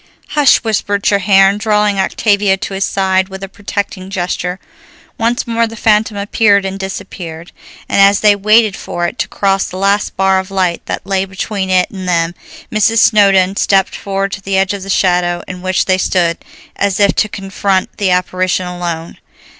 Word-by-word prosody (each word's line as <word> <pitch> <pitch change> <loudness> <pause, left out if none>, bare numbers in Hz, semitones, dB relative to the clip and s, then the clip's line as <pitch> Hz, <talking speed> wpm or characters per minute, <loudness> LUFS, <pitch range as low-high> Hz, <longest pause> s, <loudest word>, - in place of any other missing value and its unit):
"Hush!" 290 -3 +4
whispered 205 -2 -1
Treherne, 200 0 +3
drawing 210 -2 +1
Octavia 200 0 +1
to 195 - -6
his 195 0 -1
side 190 -1 0
with 190 0 -8
a - - -4
protecting 200 -1 -5
gesture. 180 -1 -3 0.6
Once 235 +1 0
more 230 -1 0
the 225 - -9
phantom 215 -1 +1
appeared 200 -1 +2
and 195 0 -4
disappeared, 175 -3 -7 0.4
and - - +2
as 200 +1 +5
they 210 -1 +5
waited 215 +1 +3
for 175 - -4
it - - -5
to - - -1
cross 195 -1 0
the 185 - -7
last 200 +1 0
bar 190 0 +3
of 190 +1 -6
light 185 -3 -1
that - - -4
lay 190 -1 0
between 195 0 -4
it 185 -1 +3
and 190 -2 -7
them, 170 -1 0 0.4
Mrs. 215 +1 +2
Snowdon 200 -3 +4
stepped 195 -1 +2
forward 195 0 -3
to 195 - -6
the 195 0 -1
edge 190 +1 +1
of 200 - -5
the 195 - -8
shadow 175 -2 +1
in 180 -1 -7
which 185 0 0
they 185 0 +1
stood, 175 -3 0 0.4
as 200 -1 -1
if 200 -1 +4
to 215 - +1
confront 195 -1 -2
the 200 -2 +1
apparition 185 0 0
alone. 175 -2 -5
195 Hz, 180 wpm, -14 LUFS, 185-205 Hz, 0.6 s, as